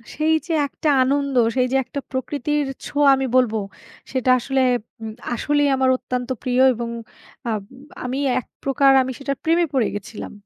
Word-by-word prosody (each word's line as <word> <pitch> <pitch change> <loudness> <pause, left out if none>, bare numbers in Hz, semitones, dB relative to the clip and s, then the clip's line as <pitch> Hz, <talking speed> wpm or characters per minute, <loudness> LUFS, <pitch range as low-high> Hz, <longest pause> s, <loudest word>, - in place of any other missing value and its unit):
সেই 315 +1 +2
যে 335 - -1
একটা 300 - -2
আনন্দ, 280 +1 0 0.2
সেই 255 -1 +2
যে 270 - +3
একটা 280 - -5
প্রকৃতির 285 +2 -1 0.2
ছোঁয়া 290 -1 +2
আমি 265 - -1
বলব 250 -4 +3 0.6
সেটা 255 -1 0
আসলে, 270 +2 0 0.4
উম 220 -1 -6 0.2
আসলেই 290 +3 +1
আমার 260 0 +2
অত্যন্ত 250 0 -4
প্রিয় 250 0 +2
এবং 235 0 -4 0.6
আব 215 - -2 0.4
আমি 255 +2 -2 0.2
১ 250 - -10 0.2
প্রকার, 275 0 +4
আমি 260 - -2
সেটার 275 -1 -3
প্রেমে 335 +2 +3
পড়ে 250 -5 +2
গেছিলাম। 205 +1 -7
265 Hz, 160 wpm, -21 LUFS, 250-285 Hz, 0.6 s, প্রকার